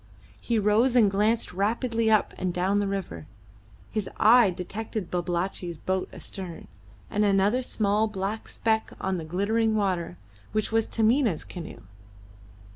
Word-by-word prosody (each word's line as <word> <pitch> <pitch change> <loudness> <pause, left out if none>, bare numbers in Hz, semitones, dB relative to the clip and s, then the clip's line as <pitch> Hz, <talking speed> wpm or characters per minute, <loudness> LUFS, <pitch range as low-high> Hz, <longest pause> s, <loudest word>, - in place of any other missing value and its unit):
He 235 - -1
rose 220 +5 +3
and 215 -5 +5
glanced 210 +1 +1
rapidly 225 +3 0
up 215 -1 +3
and 185 -1 -1
down 185 +3 +1
the 205 - 0
river. 190 - -4 0.6
His 215 -3 -2
eye 230 0 +6
detected 200 +2 -5
Babalatchi's 175 -1 -2
boat 185 +3 -2
astern, 180 -4 -8 0.4
and 210 - +1
another 200 +4 +3
small 215 -3 +1
black 210 +1 -4
speck 220 -1 -1
on 190 -1 -1
the 165 - -5
glittering 215 +6 +1
water, 185 - -1 0.4
which 215 0 -1
was 225 0 +2
Taminah's 225 - +2
canoe. 170 -3 -9
205 Hz, 135 wpm, -26 LUFS, 185-220 Hz, 0.6 s, eye